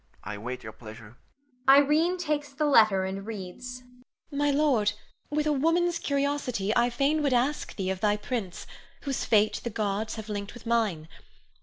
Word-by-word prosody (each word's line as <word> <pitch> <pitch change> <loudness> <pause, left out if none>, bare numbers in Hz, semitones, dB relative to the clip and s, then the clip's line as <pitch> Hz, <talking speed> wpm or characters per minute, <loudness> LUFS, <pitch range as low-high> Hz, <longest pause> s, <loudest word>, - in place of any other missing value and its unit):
I 105 - -5
await 120 +5 -6
your 110 - -7
pleasure. 110 0 -12 0.5
Irene 300 +6 +5
[takes 300 -4 -2
the 300 +2 0
letter 215 -9 +5
and 190 +1 -4
reads]. 225 +5 -7 0.5
My 290 0 +1
lord, 275 -8 +2 0.4
with 300 +1 0
a 305 - +2
woman's 335 +4 +2
curiosity, 275 -7 -1
I 240 +1 +4
fain 280 +5 +1
would 280 -3 +1
ask 255 +5 0
thee 190 -2 -2
of 190 - -4
thy 210 +1 +2
prince, 210 -5 -4 0.4
whose 275 -2 -2
fate 215 -1 +3
the 235 - -2
gods 210 0 -2
have 220 -1 -7
linked 205 0 -5
with 240 - -12
mine. 215 -9 0
235 Hz, 165 wpm, -27 LUFS, 200-290 Hz, 0.5 s, Irene